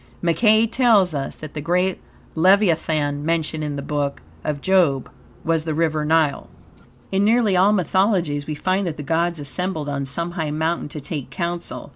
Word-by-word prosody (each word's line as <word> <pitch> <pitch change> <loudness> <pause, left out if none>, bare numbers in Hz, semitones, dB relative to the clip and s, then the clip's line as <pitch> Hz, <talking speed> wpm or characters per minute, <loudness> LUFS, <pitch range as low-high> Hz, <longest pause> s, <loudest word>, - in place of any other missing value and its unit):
Mackey 215 +6 +3
tells 225 -7 +3
us 140 -2 -3
that 155 -2 -9
the 150 - -4
great 180 +4 0 0.3
leviathan 160 -5 +2
mentioned 160 -1 -1
in 150 -1 -3
the 140 - -5
Book 145 -1 -2 0.2
of 150 -2 -2
job 165 -7 +2 0.4
was 165 -1 +1
the 155 -1 -3
river 155 -1 0
Nile. 155 -2 +1 0.6
In 195 +1 +2
nearly 220 -2 +3
all 190 +3 +5
mythologies, 180 -6 +1
we 155 - -3
find 185 +5 0
that 160 - -4
the 150 - -5
gods 170 +3 0
assembled 155 +2 -3
on 140 -1 -3
some 170 +5 -3
high 165 -4 -3
mountain 160 +1 -1
to 150 - -7
take 140 -1 -5
counsel. 175 -1 -4
165 Hz, 170 wpm, -22 LUFS, 150-185 Hz, 0.6 s, all